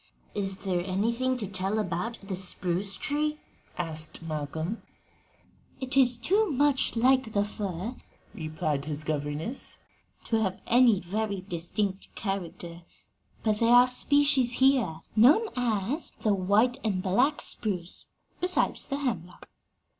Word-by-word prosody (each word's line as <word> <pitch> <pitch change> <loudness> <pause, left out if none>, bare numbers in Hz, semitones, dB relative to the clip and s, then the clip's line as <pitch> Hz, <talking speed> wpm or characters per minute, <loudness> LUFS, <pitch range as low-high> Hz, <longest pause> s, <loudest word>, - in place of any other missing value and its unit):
"Is 195 -2 -3
there 180 -3 -2
anything 230 +7 0
to 220 - -3
tell 190 +2 -2
about 205 +3 -2
the 195 -1 -4
spruce 185 +1 -3
tree?" 300 +6 -1 0.4
asked 160 -1 -2
Malcolm. 160 +5 -4 1.0
"It 260 0 -1
is 250 -3 +6
too 395 - +2
much 285 -2 +1
like 255 -1 +3
the 205 0 +2
fir," 205 +1 -5 0.4
replied 155 -3 -3
his 150 0 -3
governess, 155 - -4 0.5
"to 225 - 0
have 190 -3 -1
any 240 -4 +5
very 200 +2 -3
distinct 190 +2 -2
character; 175 -3 -5 0.6
but 215 -2 +1
there 230 - +3
are 245 0 +8
species 270 0 +3
here, 250 -11 +2
known 295 - +5
as 245 - -1
the 215 - +3
white 205 +7 +2
and 195 -4 -1
black 250 +10 +2
spruce, 185 -5 0 0.3
besides 360 +1 +2
the 275 - -2
hemlock." 180 - -4
205 Hz, 125 wpm, -28 LUFS, 180-250 Hz, 1.0 s, are